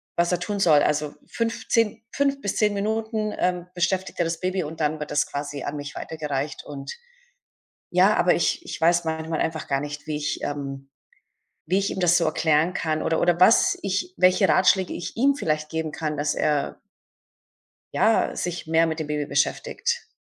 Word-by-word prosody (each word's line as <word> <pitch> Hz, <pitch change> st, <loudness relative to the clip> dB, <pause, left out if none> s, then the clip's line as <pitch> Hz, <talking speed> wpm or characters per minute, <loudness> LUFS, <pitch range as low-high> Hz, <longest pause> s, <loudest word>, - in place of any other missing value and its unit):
was 170 Hz, +1 st, +2 dB
er 180 Hz, -, +1 dB
tun 200 Hz, +2 st, -3 dB
soll. 150 Hz, -6 st, +5 dB
Also, 150 Hz, 0 st, 0 dB
5,, 230 Hz, 0 st, -3 dB
10, 225 Hz, 0 st, +1 dB
5 280 Hz, 0 st, 0 dB
bis 200 Hz, -, -2 dB
10 210 Hz, -1 st, +3 dB
Minuten, 215 Hz, +1 st, -1 dB
ähm, 180 Hz, -1 st, 0 dB
beschäftigt 185 Hz, +2 st, -1 dB
er 175 Hz, -, +3 dB
das 165 Hz, 0 st, -2 dB
Baby 185 Hz, 0 st, -1 dB
und 160 Hz, +2 st, -7 dB
dann 155 Hz, 0 st, 0 dB
wird 150 Hz, -, -5 dB
das 150 Hz, 0 st, +2 dB
quasi 145 Hz, -1 st, -5 dB
an 145 Hz, -, -4 dB
mich 145 Hz, 0 st, -7 dB
weitergereicht. 150 Hz, -2 st, -4 dB
Und 140 Hz, -2 st, -7 dB, 1.0 s
ja, -, -, +5 dB
aber -, -, +4 dB
ich 345 Hz, -, 0 dB
ich -, -, -6 dB
weiß 170 Hz, +1 st, +4 dB
manchmal 160 Hz, 0 st, -2 dB
einfach 160 Hz, -1 st, -2 dB
gar 135 Hz, -, +1 dB
nicht, 145 Hz, +1 st, -7 dB
wie 150 Hz, -1 st, -2 dB
ich 150 Hz, 0 st, -2 dB
ähm, 135 Hz, -1 st, -5 dB, 0.8 s
wie 185 Hz, +4 st, +2 dB
ich 200 Hz, -, 0 dB
ihm -, -, -5 dB
das 175 Hz, -1 st, +4 dB
so 165 Hz, -, +1 dB
erklären 155 Hz, +2 st, +2 dB
kann 155 Hz, -1 st, -1 dB
oder 160 Hz, 0 st, 0 dB
oder 175 Hz, 0 st, +2 dB
was 200 Hz, +5 st, +5 dB
ich 200 Hz, -, -2 dB
welche 185 Hz, +2 st, +4 dB
Ratschläge 185 Hz, 0 st, +3 dB
ich 175 Hz, -, -6 dB
ihm 275 Hz, +4 st, +4 dB
vielleicht 155 Hz, -, -2 dB
geben 160 Hz, -1 st, -2 dB
kann, 155 Hz, -2 st, -3 dB
dass 145 Hz, 0 st, 0 dB
er 150 Hz, -2 st, 0 dB, 1.1 s
ja, -, -, +2 dB
sich 175 Hz, -2 st, -4 dB
mehr 165 Hz, +1 st, +4 dB
mit 160 Hz, 0 st, -3 dB
dem 155 Hz, -, -3 dB
Baby 150 Hz, -1 st, -2 dB
beschäftigt. 470 Hz, -, -1 dB
165 Hz, 190 wpm, -24 LUFS, 150-190 Hz, 1.1 s, soll